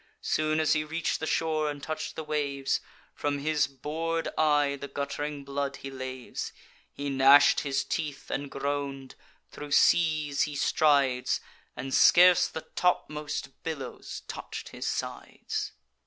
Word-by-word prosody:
Soon 155 0 +1
as 155 - +3
he 155 -1 +1
reach'd 160 +2 -2
the 160 - -3
shore 155 -2 +1
and 145 -1 -6
touch'd 155 0 -4
the 160 - -4
waves, 140 -3 -1 0.3
From 145 -1 -1
his 150 +1 +1
bor'd 160 +5 -3
eye 145 -2 +3
the 140 0 -7
gutt'ring 140 +1 -4
blood 140 0 -2
he 135 - -8
laves: 130 -1 -5 0.4
He 145 - -5
gnash'd 135 +2 +7
his 140 -2 -1
teeth, 150 -4 -4
and 140 0 -3
groan'd; 140 -1 -3 0.4
thro' 150 - -8
seas 155 -1 +3
he 150 -1 0
strides, 140 -4 +2 0.4
And 135 0 -5
scarce 180 0 +7
the 160 - -6
topmost 150 -5 -1
billows 140 -6 -6
touch'd - - -7
his - - -5
sides. - - -4
145 Hz, 140 wpm, -28 LUFS, 140-155 Hz, 0.4 s, gnash'd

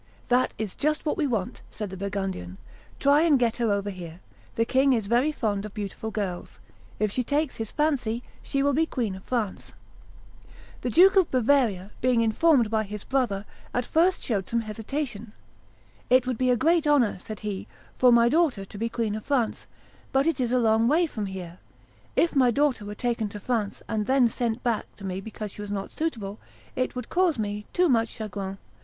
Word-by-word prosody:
"That 250 +1 +2
is 215 -4 -4
just 305 +2 0
what 300 - +1
we 300 - 0
want," 220 -8 -2
said 210 -3 -6
the - - -6
Burgundian: 190 - -4 0.4
"try 285 +2 +5
and 320 -4 +5
get 240 -3 +1
her 235 -3 +1
over 200 0 -1
here; 175 -3 -9 0.4
the 230 - +2
king 265 +2 +3
is 225 -4 0
very 240 +8 +2
fond 210 -8 -1
of 210 -1 -8
beautiful 210 +1 -4
girls; 200 -5 -4 0.4
if 215 -1 0
she 250 - 0
takes 285 +3 -1
his 225 -1 -4
fancy, 250 -7 0 0.2
she 275 -1 -1
will 285 0 +3
be 320 +4 +2
Queen 230 -10 -2
of 190 0 -9
France." 225 -6 -3 1.1
The 250 - -1
Duke 375 - +6
of 375 -4 +5
Bavaria, 235 -7 +2
being 250 -2 +3
informed 230 +1 +3
by 220 -1 +2
his 210 -1 -6
brother, 235 -7 0 0.3
at 245 0 0
first 350 +6 +2
showed 200 -6 -1
some 235 0 +1
hesitation. 225 0 -5 0.8
"It 255 0 +5
would 255 -3 -2
be 255 -1 +2
a 250 - +4
great 325 +4 +3
honor," 260 -10 +3
said 215 +3 -8
he, 205 -3 -4 0.3
"for 250 -1 +6
my 235 0 +6
daughter 280 - +2
to 200 - -11
be 230 +1 -1
Queen 230 -3 -1
of 215 - -5
France; 255 -6 0 0.4
but 270 +1 +3
it 330 -3 +1
is 245 -2 0
a 255 - +3
long 225 -1 +3
way 320 +6 +4
from 215 -10 -4
here. 185 -2 -7 0.6
If 335 - +2
my 255 -3 +5
daughter 265 -4 +1
were 210 0 -6
taken 230 -2 -1
to 210 - -8
France, 215 -1 -2
and 210 -1 -1
then 260 -3 +4
sent 235 0 -2
back 235 -3 0
to 200 - -13
me 190 0 -3
because 215 0 -7
she 205 - -8
was 205 - -6
not 200 -1 -4
suitable, 225 -11 -3 0.4
it 255 0 -1
would 250 -2 -5
cause 355 -5 +2
me 210 -1 -3
too 360 0 +3
much 230 -5 +2
chagrin. 195 -2 -5
230 Hz, 200 wpm, -26 LUFS, 205-270 Hz, 1.1 s, Duke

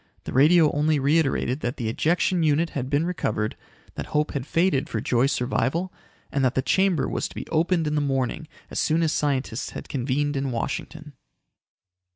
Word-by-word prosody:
The - - -6
radio 155 +4 +5
only 150 +1 +2
reiterated 140 -2 +1
that 125 0 -3
the 120 -4 -3
ejection 170 - +1
unit 160 +1 +2
had 130 -2 -3
been 145 +3 +1
recovered, 110 -11 -2 0.4
that - - -6
hope 150 +1 0
had 140 -1 -4
faded 165 -5 +1
for 110 - -2
Joy's 125 +5 +1
survival 140 +7 -1 0.4
and 140 - 0
that 130 -1 +2
the 130 - +1
chamber 190 -2 +2
was - - -2
to - - -15
be - - -5
opened 165 +1 +2
in 150 - -1
the 150 - +1
morning 135 +2 -1 0.2
as - - -2
soon 165 +1 +2
as 160 - +1
scientists 135 -5 -1
had - - -8
convened 140 +2 -1
in 135 0 -1
Washington. 150 +5 -4
145 Hz, 185 wpm, -24 LUFS, 130-160 Hz, 0.4 s, radio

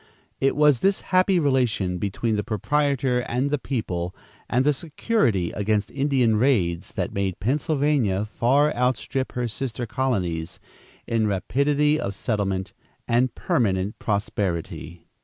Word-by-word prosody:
It 135 - +2
was 150 -3 +4
this 195 +7 +2
happy 185 0 +3
relation 125 - +1
between 105 +4 -1
the 105 - -1
proprietor 135 +3 0
and 125 +3 -1
the 150 - +1
people, 90 -10 -3 0.3
and 130 +2 +2
the 150 - +4
security 145 - 0
against 105 0 -1
Indian 135 -5 +2
raids, 105 -9 +1
that - - -3
made 95 -2 -2
Pennsylvania 135 - +1
far 135 +7 +2
outstrip 130 +1 -1
her 125 -1 -1
sister 120 +1 -4
colonies 100 -10 -2 0.5
in 115 -2 +1
rapidity 140 +9 +1
of 100 - -3
settlement 95 -4 -2 0.3
and 120 +1 +2
permanent 100 -3 0
prosperity. 90 -5 -3
120 Hz, 125 wpm, -24 LUFS, 100-140 Hz, 0.5 s, was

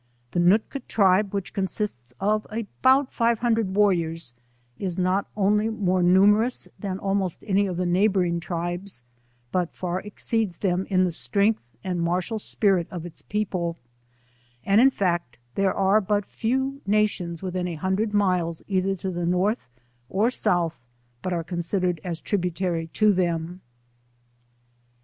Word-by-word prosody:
The - - -1
Noolka 210 +10 +2
tribe 195 -1 +3
which 200 -2 -4
consists 190 - -2
of 215 +1 0
about 260 +5 +2
five 235 -1 +2
hundred 225 -5 0
warriors, 170 -9 +1 0.5
is 185 -3 -3
not 185 +2 +1
only 210 +2 +2
more 185 -4 0
numerous 205 +7 +4
than 195 -3 -3
almost 195 -2 -1
any 200 -1 +2
of 180 -2 -4
the 180 - 0
neighbouring 180 -1 +2
tribes, 175 -3 -4 0.5
but 180 -2 -1
far 180 0 -2
exceeds 210 -1 -2
them 185 -1 0
in 185 -2 +3
the 180 - +1
strength 200 - +1 0.2
and 180 -2 -2
martial 180 +6 -1
spirit 195 -5 +1
of 175 -2 -6
it« 175 - -9
people; 185 -5 -1 0.9
and 200 +3 +5
in 265 - +7
fact 175 - -1 0.2
there 195 -1 +2
are 195 +2 +3
but 205 0 0
few 265 +6 -2
nations 195 -5 0
within 180 -1 -2
a 170 - -4
hundred 190 +6 -1
miles 180 -5 +1
either 195 0 +1
to 190 +1 -4
the 175 -1 -2
North 185 - 0 0.4
or 215 +6 +2
South 175 -8 0 0.4
but 185 - -3
are 170 -2 -1
considered 175 0 -1
as 170 -3 -4
tributary 180 -3 -1
to 210 +5 +3
them. 175 -1 -1
190 Hz, 145 wpm, -25 LUFS, 175-210 Hz, 0.9 s, in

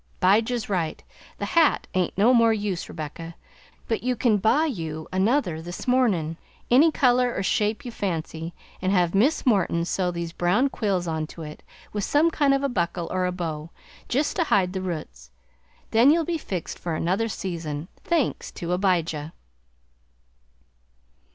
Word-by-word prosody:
'Bijah's 220 +5 +2
right; 175 -6 -2 0.3
the - - -3
hat 330 -3 +3
ain't 185 -1 0
no 225 +6 +5
more 230 -2 +5
use, 205 -5 -2
Rebecca, 165 +2 -7 0.5
but 225 - -1
you 250 +1 0
can 225 -2 +2
buy 235 +10 +3
you 160 - -4
another 190 - +1
this 175 +7 -7
mornin' 200 -11 +2 0.3
any 295 +7 +6
color 250 -3 +3
or 190 - -1
shape 210 +3 0
you 245 - -5
fancy 165 -4 -4 0.3
an' 185 - 0
have 180 -3 +2
Miss 250 +11 +2
Morton 190 -8 +2
sew 180 +1 0
these 170 -1 -4
brown 195 +12 +2
quills 195 -8 -1
on 160 -1 -2
to 165 - -9
it 150 0 -9 0.3
with 205 -1 -2
some 310 +8 +3
kind 285 -3 +3
of 275 - -1
a - - +3
buckle 175 -7 -2
or 185 0 0
a - - -1
bow, 165 -3 -4 0.4
jest 285 +4 0
to 340 - +2
hide 190 -8 +2
the 190 - -3
roots. 170 - -6 0.6
Then 235 +5 +6
you'll 325 +2 +4
be 335 0 -2
fixed 185 - -5
for 170 -2 -3
another 190 +8 0
season, 165 -7 -4 0.2
thanks 335 -6 0
to 175 +1 -2
'Bijah." 170 -5 0
190 Hz, 165 wpm, -25 LUFS, 170-245 Hz, 0.6 s, any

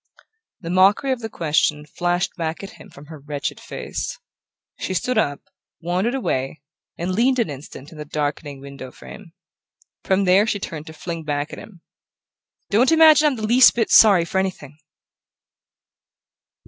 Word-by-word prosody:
The 170 -2 -5
mockery 195 +9 +3
of 260 - -1
the 225 -1 -6
question 150 -4 0
flashed 175 +3 -2
back 160 +1 -4
at 195 - -8
him - - -15
from 140 - -14
her 155 0 -11
wretched 145 0 -5
face. - - -6 0.6
She 185 - -3
stood 250 +5 0
up, 145 -8 -1 0.4
wandered 185 +9 -1
away, 140 - -3 0.3
and 175 +2 -3
leaned 250 +6 +2
an 230 -10 0
instant 140 +1 -11
in 155 - -13
the - - -4
darkening 145 -1 -4
window 140 -2 -9
frame. 175 +6 -13 0.7
From 190 +1 +1
there 190 +4 +4
she 210 - 0
turned 155 -5 -7
to 160 - -9
fling 165 0 -6
back 145 -1 -3
at - - -7
him: 185 -6 -14 0.9
"Don't 235 +7 +4
imagine 315 -2 +6
I'm 285 - 0
the 215 -2 -4
least 245 +4 +6
bit 230 -2 0
sorry 195 -6 +6
for 190 - -1
anything!" 155 -6 -5
175 Hz, 160 wpm, -21 LUFS, 150-215 Hz, 0.9 s, imagine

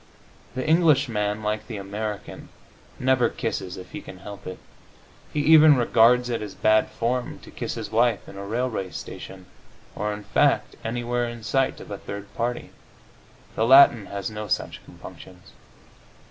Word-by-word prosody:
The 130 +3 -3
Englishman, 130 -11 +2
like 105 0 -2
the 115 -3 -6
American, 105 +1 -6 0.5
never 130 -2 +3
kisses 100 -5 -4
if 90 - -11
he 155 - -7
can 95 - -11
help 100 +2 -10
it. 95 - -6 0.7
He 150 - -1
even 155 -1 +7
regards 120 +1 +4
it 115 - -2
as 105 -2 -7
bad 110 0 +3
form 120 +2 -2
to - - -13
kiss - - -5
his - - -6
wife 115 -1 +1
in - - -11
a 100 - -7
railway 110 -2 -2
station, 95 +1 -9 0.5
or, 105 0 -2
in 105 0 -6
fact, - - +1
anywhere 120 +1 -2
in 120 -1 -9
sight 135 +3 0
of - - -11
a 100 - -5
third 100 0 -8
party. 120 +1 -3 0.8
The 110 - +1
Latin 130 -5 +7
has 100 +1 -5
no 105 0 -6
such - - -2
compunctions. 90 -1 -13
115 Hz, 160 wpm, -24 LUFS, 105-125 Hz, 0.8 s, even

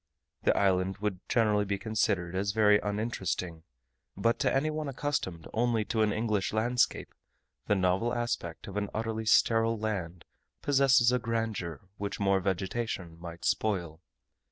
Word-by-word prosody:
The - - +2
island 95 0 +2
would 105 -3 -2
generally 105 -3 +3
be 100 0 -2
considered 100 -5 0
as 100 +2 -1
very 105 -1 +5
uninteresting, 95 -6 -3 0.6
but 115 +6 +1
to 140 -2 +2
anyone 155 +2 0
accustomed 130 - -3
only 115 -2 +1
to 110 - 0
an 105 -1 +3
English 110 -2 0
landscape, 120 +3 +1 0.5
the 105 - +3
novel 95 +5 +1
aspect 120 -9 -3
of 100 0 -6
an 105 -1 -1
utterly 110 0 -2
sterile 115 0 +4
land 95 -6 -4 0.4
possesses 135 -3 +4
a 125 - +2
grandeur 115 - -3 0.2
which 100 0 -4
more 100 -1 +3
vegetation 95 -2 -3
might 85 0 -8
spoil. 85 -7 -1
105 Hz, 140 wpm, -30 LUFS, 95-115 Hz, 0.6 s, very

